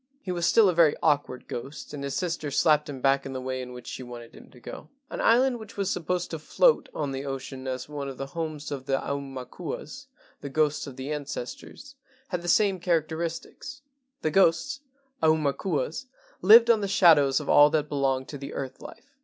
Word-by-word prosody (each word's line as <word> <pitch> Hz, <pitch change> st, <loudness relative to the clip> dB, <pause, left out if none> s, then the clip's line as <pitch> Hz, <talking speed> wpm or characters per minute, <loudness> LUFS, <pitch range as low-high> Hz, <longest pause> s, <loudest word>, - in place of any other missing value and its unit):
He 185 Hz, -, -4 dB
was 175 Hz, -1 st, 0 dB
still 225 Hz, -3 st, +5 dB
a 185 Hz, -, +3 dB
very 160 Hz, -3 st, +4 dB
awkward 145 Hz, -5 st, 0 dB
ghost, 135 Hz, +4 st, -7 dB
and 140 Hz, -1 st, -6 dB
his 140 Hz, -1 st, -3 dB
sister 170 Hz, -5 st, -2 dB
slapped 150 Hz, +1 st, +3 dB
him 135 Hz, -3 st, -7 dB
back 135 Hz, 0 st, +3 dB
in 135 Hz, -, -6 dB
the 130 Hz, -, -4 dB
way 130 Hz, 0 st, -4 dB
in 125 Hz, 0 st, -8 dB
which 125 Hz, -1 st, -10 dB
she -, -, -6 dB
wanted 120 Hz, -2 st, -10 dB
him -, -, -15 dB
to 125 Hz, -, -17 dB
go. -, -, -10 dB, 0.2 s
An -, -, -4 dB
island 245 Hz, +1 st, +3 dB
which 220 Hz, -2 st, -12 dB
was 195 Hz, -1 st, 0 dB
supposed 180 Hz, +1 st, -2 dB
to 160 Hz, -, -4 dB
float 485 Hz, -, +2 dB
on 145 Hz, -3 st, -2 dB
the 135 Hz, 0 st, -4 dB
ocean 135 Hz, -1 st, -6 dB
as 130 Hz, -1 st, -4 dB
one 145 Hz, -2 st, -5 dB
of 135 Hz, -, -8 dB
the 135 Hz, -, -4 dB
homes 155 Hz, 0 st, -5 dB
of 135 Hz, -1 st, -5 dB
the 135 Hz, -1 st, +2 dB
aumakuas 135 Hz, -2 st, -6 dB, 0.3 s
(the 140 Hz, -, -7 dB
ghosts 150 Hz, +1 st, 0 dB
of 135 Hz, -, -9 dB
the 135 Hz, +3 st, -4 dB
ancestors) 150 Hz, -, -7 dB, 0.4 s
had 180 Hz, -3 st, -2 dB
the 175 Hz, -, -7 dB
same 195 Hz, 0 st, +3 dB
characteris¬ 165 Hz, -1 st, -1 dB
tics. 285 Hz, 0 st, -11 dB, 0.4 s
The 155 Hz, -, +1 dB
ghosts 195 Hz, -, +2 dB, 0.4 s
(aumakuas) 155 Hz, -, 0 dB, 0.3 s
lived 230 Hz, +5 st, +8 dB
on 220 Hz, -2 st, +2 dB
the 200 Hz, -, -1 dB
shadows 150 Hz, -8 st, +5 dB
of 150 Hz, -, -8 dB
all 145 Hz, 0 st, +7 dB
that 150 Hz, -1 st, 0 dB
belonged 135 Hz, -2 st, -1 dB
to 145 Hz, -, -7 dB
the 140 Hz, +1 st, -7 dB
earth 135 Hz, -1 st, -6 dB
life. 280 Hz, -, -12 dB
150 Hz, 205 wpm, -27 LUFS, 135-175 Hz, 0.4 s, lived